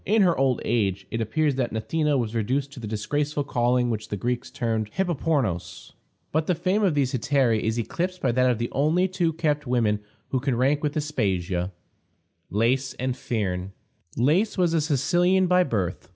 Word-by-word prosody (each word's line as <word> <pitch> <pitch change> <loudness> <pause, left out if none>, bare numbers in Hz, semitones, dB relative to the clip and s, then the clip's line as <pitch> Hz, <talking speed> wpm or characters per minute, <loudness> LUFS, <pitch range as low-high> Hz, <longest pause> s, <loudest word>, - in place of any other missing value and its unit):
In 215 +1 +3
her 175 -3 +3
old 130 -2 +1
age 100 -4 0
it 115 - -2
appears 145 +7 +1
that 125 -3 0
Gnathena 145 +7 0
was 115 -3 -2
reduced 130 +5 -1
to 140 - -10
the 110 - -6
disgraceful 145 +8 -1
calling 125 -1 +1
which 110 -1 -4
the 105 - -3
Greeks 120 +4 -2
termed 110 -3 -2
hippopornos. 145 - -1 0.4
But 155 +1 0
the 180 - +2
fame 185 +5 +1
of 190 -7 +2
these 135 -3 +1
hetairæ 130 -3 +2
is 110 +2 -1
eclipsed 180 - -2
by 130 - +1
that 125 +1 +3
of 120 - +1
the 120 +1 -3
only 160 +7 +2
two 180 -3 0
kept 150 -3 -1
women 115 -4 +1 0.3
who 130 - 0
can 130 -2 -1
rank 140 +4 +2
with 150 0 -1
Aspasia 95 - -1 0.8
Lais 125 +5 +1
and 130 0 -2
Phryne. 100 -8 -3 0.4
Lais 160 - +2
was 175 -3 +2
a 165 - +3
Sicilian 175 +6 +2
by 180 0 +4
birth. 95 - -2
130 Hz, 180 wpm, -25 LUFS, 115-155 Hz, 0.8 s, by